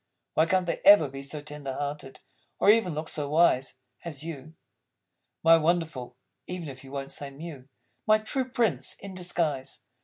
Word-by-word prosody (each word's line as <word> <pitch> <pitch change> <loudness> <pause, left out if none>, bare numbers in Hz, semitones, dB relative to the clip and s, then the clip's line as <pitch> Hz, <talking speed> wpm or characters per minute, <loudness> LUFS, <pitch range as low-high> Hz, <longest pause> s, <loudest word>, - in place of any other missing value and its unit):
Why 160 +2 +3
can't 185 +1 +2
they 170 - -2
ever 200 -7 +8
be 135 0 -8
so 145 +2 -6
tender 145 -3 -6
hearted, 145 -1 -5 0.4
Or 205 - +6
even 210 -7 +2
look 155 +1 -4
so 145 -2 -3
wise 145 -5 +3 0.3
As 155 -4 -6
You? 155 -1 -8 0.9
My 165 0 +8
Wonderful 160 -7 -1 0.3
(even 180 -4 -5
if 130 -1 -10
you 135 - -12
Won't 140 -1 -5
say 140 - -5
Mew), 140 -2 -9 0.4
My 215 0 +6
True 255 +4 -3
Prince 235 -6 0
in 195 -1 -9
Disguise! 170 -7 -2
155 Hz, 165 wpm, -28 LUFS, 140-175 Hz, 0.9 s, ever